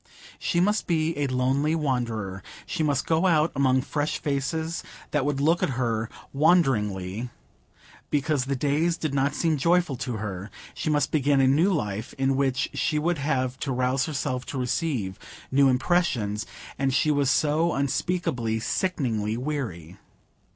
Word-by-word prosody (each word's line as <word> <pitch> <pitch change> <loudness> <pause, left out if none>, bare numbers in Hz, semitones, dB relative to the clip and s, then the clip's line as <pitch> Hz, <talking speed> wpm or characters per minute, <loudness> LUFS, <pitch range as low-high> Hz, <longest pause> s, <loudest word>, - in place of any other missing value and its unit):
She 170 - 0
must 205 +4 +1
be 165 -1 +1
a 145 - +1
lonely 135 +4 +1
wanderer; 115 -10 -2 0.2
she 175 - -3
must 145 -4 +1
go 165 +3 +2
out 160 -2 +3
among 130 -1 +3
fresh 145 +1 -1
faces, 160 +4 -2 0.3
that 145 -3 +1
would 145 -1 0
look 165 +4 +3
at 140 -9 0
her 115 -3 -1 0.2
wonderingly, 120 - +2 0.8
because 145 -2 +1
the 140 +1 -1
days 150 +5 +1
did 155 -3 -3
not 140 +1 +1
seem 160 -3 +1
joyful 170 0 +2
to 125 +1 -3
her; 100 -2 -5 0.2
she - - -3
must 150 -1 +1
begin 145 -2 +3
a 135 - +5
new 155 +9 +4
life, 105 - -2
in 135 0 +1
which 135 0 0
she 150 - 0
would 165 +1 0
have 130 -3 -1
to 140 - -2
rouse 125 +1 +1
herself 130 -4 -2
to 140 - -4
receive 125 - -1 0.3
new 135 0 +5
impressions; 125 - +1 0.3
and 135 -1 +1
she 155 +2 +3
was 140 -3 +2
so 155 +4 +2
unspeakably, 135 -5 -1
sickeningly 115 - -1
weary! 115 - -4
140 Hz, 155 wpm, -26 LUFS, 125-155 Hz, 0.8 s, a